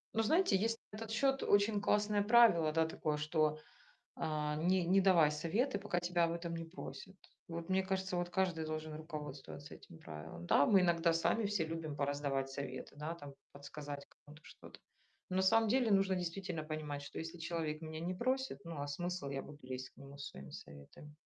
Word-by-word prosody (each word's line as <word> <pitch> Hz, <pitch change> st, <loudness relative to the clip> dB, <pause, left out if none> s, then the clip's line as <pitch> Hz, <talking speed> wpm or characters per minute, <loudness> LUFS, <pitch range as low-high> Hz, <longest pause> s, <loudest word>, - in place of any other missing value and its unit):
Ну, 225 Hz, -, +3 dB
знаете, 315 Hz, -, +3 dB
есть 225 Hz, +4 st, +1 dB
на 210 Hz, -, -8 dB
этот 225 Hz, 0 st, -6 dB
счёт 270 Hz, +3 st, +2 dB
очень 205 Hz, 0 st, +3 dB
классное 210 Hz, 0 st, +2 dB
правило, 205 Hz, -8 st, +6 dB
да, 160 Hz, +1 st, +3 dB
такое, 155 Hz, -1 st, -2 dB
что, 155 Hz, 0 st, +1 dB, 0.6 s
э, -, -, -12 dB, 0.4 s
не 180 Hz, +3 st, +2 dB
не 190 Hz, +3 st, +5 dB
давай 175 Hz, -6 st, +6 dB
советы, 200 Hz, -, 0 dB
пока 195 Hz, -3 st, -1 dB
тебя 175 Hz, 0 st, +2 dB
об 165 Hz, -, +1 dB
этом 170 Hz, 0 st, -4 dB
не 165 Hz, 0 st, -4 dB
просят. 185 Hz, +3 st, -9 dB, 0.3 s
Вот 170 Hz, 0 st, -5 dB
мне 190 Hz, 0 st, +3 dB
кажется, 190 Hz, -1 st, -1 dB
вот 175 Hz, 0 st, -1 dB
каждый 180 Hz, -3 st, 0 dB
должен 155 Hz, 0 st, -4 dB
руководствоваться 150 Hz, -2 st, -7 dB
этим 80 Hz, -, -14 dB
правилом. 80 Hz, +2 st, -8 dB
Да, 145 Hz, -, +5 dB
мы 195 Hz, -3 st, +6 dB
иногда 170 Hz, -1 st, +3 dB
сами 170 Hz, +7 st, +2 dB
все 200 Hz, -5 st, 0 dB
любим 160 Hz, -2 st, -4 dB
пораздавать 140 Hz, -1 st, -1 dB
советы, 135 Hz, -1 st, -6 dB
да, 155 Hz, +3 st, -4 dB
там 145 Hz, -4 st, -10 dB, 0.2 s
подсказать 145 Hz, 0 st, -7 dB
кому-то 150 Hz, +1 st, -17 dB
что-то. -, -, -13 dB, 0.5 s
Но 185 Hz, -, -1 dB
на 190 Hz, -, +3 dB
самом 225 Hz, +4 st, +5 dB
деле 245 Hz, -1 st, +3 dB
нужно 195 Hz, -1 st, +4 dB
действительно 180 Hz, -1 st, -3 dB
понимать, 155 Hz, -2 st, -4 dB
что, 140 Hz, -, -8 dB
если 165 Hz, +1 st, -6 dB
человек 165 Hz, -2 st, -3 dB
меня 155 Hz, 0 st, -6 dB
не 175 Hz, +2 st, -2 dB
просит, 255 Hz, -, -1 dB
ну, 165 Hz, -3 st, -5 dB
а 145 Hz, -, -2 dB
смысл- 175 Hz, 0 st, -3 dB
я 135 Hz, -1 st, -3 dB
буду 145 Hz, 0 st, -11 dB
лезть 130 Hz, 0 st, -6 dB
к -, -, -39 dB
нему 140 Hz, 0 st, -11 dB
со 140 Hz, 0 st, -7 dB
своими 70 Hz, 0 st, -10 dB
советами? 70 Hz, -, -11 dB
165 Hz, 195 wpm, -36 LUFS, 150-190 Hz, 0.6 s, правило